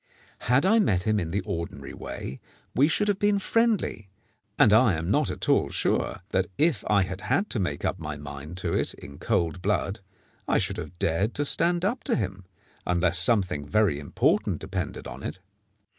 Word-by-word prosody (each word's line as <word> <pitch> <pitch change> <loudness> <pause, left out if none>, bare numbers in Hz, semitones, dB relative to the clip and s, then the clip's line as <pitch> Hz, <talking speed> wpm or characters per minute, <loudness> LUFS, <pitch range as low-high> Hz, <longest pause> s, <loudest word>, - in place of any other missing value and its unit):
Had 125 +5 +4
I 220 +4 +5
met 95 - +2
him 110 +1 +1
in 85 - -3
the 100 +4 -1
ordinary 85 0 -5
way, 65 - -7 0.3
we 140 +4 +4
should 210 +6 +1
have 205 -1 +1
been 205 0 +3
friendly, 210 - 0 0.5
and 105 - +6
I 110 -4 +5
am 85 +4 -2
not - - +2
at - - -3
all - - +3
sure - - -1
that, 95 -1 +1
if 160 -1 +2
I 100 -2 +4
had 95 +1 -5
had 200 - 0
to 115 - +1
make 90 - -2
up - - -1
my 75 0 -5
mind 75 +3 -8
to - - 0
it - - -1
in 70 - -12
cold 85 +1 0
blood, 100 +1 -1 0.5
I - - +3
should - - -1
have 90 - -7
dared 90 +7 0
to 145 - 0
stand 175 +4 +2
up 235 +6 -1
to - - +2
him, 95 -3 -3 0.4
unless 85 0 +2
something 90 -8 +1
very 100 -6 +2
important 75 - +1
depended - - -4
on - - -8
it. 75 - -5
100 Hz, 190 wpm, -26 LUFS, 85-145 Hz, 0.5 s, and